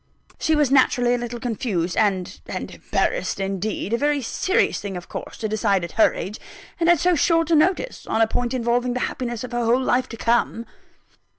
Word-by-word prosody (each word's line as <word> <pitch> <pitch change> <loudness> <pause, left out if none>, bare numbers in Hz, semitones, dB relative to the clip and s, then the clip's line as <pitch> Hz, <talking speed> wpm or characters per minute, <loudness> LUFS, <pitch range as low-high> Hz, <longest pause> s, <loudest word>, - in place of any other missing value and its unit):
She 315 - +2
was 295 -3 +2
naturally 245 -2 +4
a - - +2
little 240 0 -5
confused 210 -8 -2
and 195 -4 0
and - - -5
embarrassed, - - -1
indeed. 195 +2 -2
A 235 - +1
very 290 0 +1
serious 370 - 0
thing 195 -3 -5
of 175 - -9
course, - - -7
to 220 - -2
decide 205 -3 +1
at 170 - -5
her 225 - +4
age, 210 +4 -5 0.4
and 335 0 +3
at 345 - +6
so 360 +3 +3
short 330 +1 +2
a - - +6
notice, 365 +10 +1
on 220 - 0
a 225 - +6
point 245 +3 -2
involving 245 0 0
the 250 - -1
happiness 240 -2 -3
of 250 - -7
her 240 0 -1
whole 235 +2 +3
life 255 0 +1
to 230 - -8
come." 230 0 +1
240 Hz, 205 wpm, -23 LUFS, 215-275 Hz, 0.4 s, at